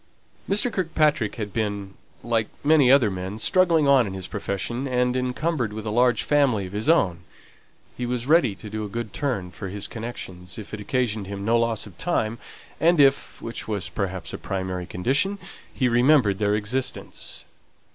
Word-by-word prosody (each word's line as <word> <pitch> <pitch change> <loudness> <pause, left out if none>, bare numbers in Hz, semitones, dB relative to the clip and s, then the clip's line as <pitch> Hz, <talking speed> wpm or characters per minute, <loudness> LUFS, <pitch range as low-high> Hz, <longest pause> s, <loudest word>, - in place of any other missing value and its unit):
Mr. 210 +4 +2
Kirkpatrick 155 - +1
had 105 -4 -5
been, 100 -3 -2 0.3
like 115 -2 0 0.2
many 145 -4 +5
other 130 -7 +5
men, 95 +2 -5
struggling 165 - +3
on 135 -5 +5
in 95 - -5
his 95 -1 -5
profession, 105 +7 -3
and 125 -1 +1
encumbered 125 -1 -1
with 110 0 -6
a 105 - -2
large 120 0 +3
family 135 -9 +2
of 90 - -9
his 105 +8 -1
own; 95 - +3 0.8
he 125 - -3
was 125 -1 -2
ready 140 - +4
to 105 - -10
do 110 +1 -4
a 105 - -5
good 115 0 -5
turn 110 -11 -2
for 95 +4 -7
his 100 +1 -5
connections, 95 -6 -7
if 110 -1 -9
it 105 - -4
occasioned 110 -2 -1
him 100 0 -5
no 115 +2 +3
loss 115 -2 0
of 95 -5 -14
time, 115 -10 -1 0.4
and 170 0 +4
if 140 -1 +3
(which 115 - -6
was, 100 -5 -3
perhaps, 95 -3 -4
a - - -5
primary 95 -2 -3
condition) 140 - 0 0.3
he 130 - +1
remembered 120 -4 +4
their 105 -1 +2
existence. 115 +5 -3
115 Hz, 175 wpm, -24 LUFS, 100-135 Hz, 0.8 s, many